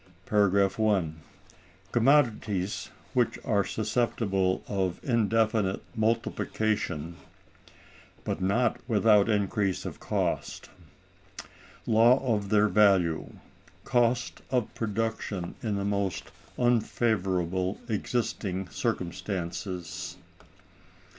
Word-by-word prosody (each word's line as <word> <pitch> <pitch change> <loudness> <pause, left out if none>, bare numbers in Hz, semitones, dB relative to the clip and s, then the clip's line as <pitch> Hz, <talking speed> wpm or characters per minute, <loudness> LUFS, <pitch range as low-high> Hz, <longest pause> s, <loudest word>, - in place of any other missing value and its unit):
§ 100 -2 +3
1. 95 -8 +1 0.8
Commodities 115 -7 +2 0.2
which - - +1
are 100 - +2
susceptible 105 -4 0
of 95 -3 -1
indefinite 110 -4 +1
Multiplication, 110 -6 -1 1.1
but - - -3
not 110 +6 +1
without 105 -2 +4
increase 100 -2 0
of - - -6
Cost. - - -2 1.1
Law 115 +3 +5 0.2
of 100 -2 -2
their 105 0 +4
Value, 95 -5 +3 0.5
Cost 120 0 +1
of 125 -4 0
Production 110 -4 -3
in 110 -3 -1
the 100 0 -2
most 100 -2 -2 0.3
unfavorable 95 -6 +1
existing 105 -4 -2
circumstances. 90 0 -4
105 Hz, 80 wpm, -28 LUFS, 95-115 Hz, 1.1 s, Law